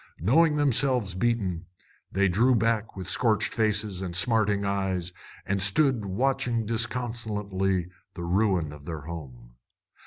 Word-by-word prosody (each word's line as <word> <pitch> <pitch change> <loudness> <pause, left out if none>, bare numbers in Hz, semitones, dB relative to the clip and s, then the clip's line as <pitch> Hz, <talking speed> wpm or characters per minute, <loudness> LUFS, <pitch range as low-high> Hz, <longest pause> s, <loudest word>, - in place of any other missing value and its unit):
Knowing 150 - +4
themselves 130 -7 +2
beaten, 95 -4 -1 0.4
they 100 +1 +2
drew 115 +8 +3
back 115 0 0
with 95 -2 -7
scorched 110 0 +1
faces 105 -3 0
and 90 -2 -5
smarting 105 0 +2
eyes 95 -3 -2 0.3
and 100 0 -1
stood 115 +3 +3
watching 120 +2 0
disconsolately 105 -5 -1 0.3
the 85 - -6
ruin 90 -4 +1
of 75 -1 -13
their 80 -2 -5
home. 65 -7 -10
100 Hz, 125 wpm, -27 LUFS, 90-115 Hz, 0.4 s, Knowing